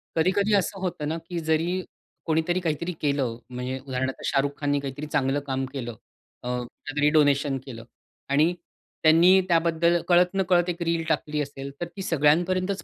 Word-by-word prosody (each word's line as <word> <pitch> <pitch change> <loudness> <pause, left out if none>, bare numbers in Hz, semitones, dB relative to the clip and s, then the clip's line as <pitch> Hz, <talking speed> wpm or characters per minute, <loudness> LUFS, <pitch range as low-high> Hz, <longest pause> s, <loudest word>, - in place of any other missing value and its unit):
कधी-कधी 195 +6 +2
असं 195 0 0
होतं 170 -5 -3
ना 160 - -2
की 175 - -3
जरी 165 +3 0 0.4
कोणीतरी 160 +2 +1
काहीतरी 170 0 -2
केलं, 140 -6 0
म्हणजे 125 +1 -4
उदाहरणार्थ 130 0 -3
शाहरुख 140 +1 +1
खाननी 145 -1 +1
काहीतरी 140 +2 -5
चांगलं 140 -1 0
काम 135 0 -1
केलं 120 -3 -4 0.5
अ, - - -6
काहीतरी 145 +4 -1
डोनेशन 145 -2 +3
केलं 115 -4 -9 0.4
आणि 155 +5 +3 0.5
त्यांनी 170 +4 +6
त्याबद्दल 170 0 +2
कळत-नकळत 180 0 +3
एक 170 0 -4
रील 165 -1 0
टाकली 150 0 0
असेल 140 -1 -6
तर - - 0
ती 195 - -6
सगळ्यांपर्यंतच 185 +3 +1
155 Hz, 150 wpm, -25 LUFS, 140-175 Hz, 0.5 s, त्यांनी